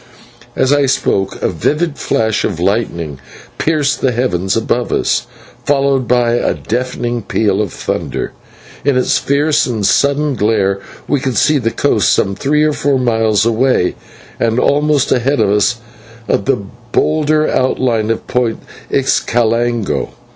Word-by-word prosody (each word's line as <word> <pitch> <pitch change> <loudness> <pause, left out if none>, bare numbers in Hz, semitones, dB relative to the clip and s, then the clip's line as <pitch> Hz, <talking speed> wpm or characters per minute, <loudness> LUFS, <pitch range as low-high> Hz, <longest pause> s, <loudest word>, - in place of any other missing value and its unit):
As 130 - +2
I 145 -1 +3
spoke 95 -7 0
a - - +3
vivid 150 - -1
patch 110 -6 0
of 90 -5 -2
lightning 85 - -1 0.4
pierced 150 -3 0
the 130 - +2
heavens 105 -6 0
above 120 +2 -1
us, - - 0 0.4
followed 135 -3 +1
by 120 -1 +2
a 120 - 0
deafening 120 0 -3
peal 105 -1 0
of 105 - -3
thunder. - - -3 0.5
In 140 -2 +2
its 125 - +2
fierce 145 +2 +1
and 110 -5 -2
sudden 140 +6 +2
glare 100 -4 +1 0.3
we 145 - +1
could 130 -2 -2
see 155 -2 +3
the 115 -3 0
coast - - +1
some 100 - +1
three 150 +7 +1
or 155 0 +2
four 140 -1 +1
miles 115 -4 +1
away, 115 -4 +2 0.5
and 115 0 +1
almost 145 0 +2
ahead 135 +4 +1
of 100 - +2
us 105 +4 +2 0.5
the 100 0 0 0.3
bolder 155 +1 +2
outline 125 -4 0
of 115 - -2
Point 120 -2 0 0.3
Xicalango. 120 -4 0
120 Hz, 140 wpm, -15 LUFS, 110-140 Hz, 0.5 s, I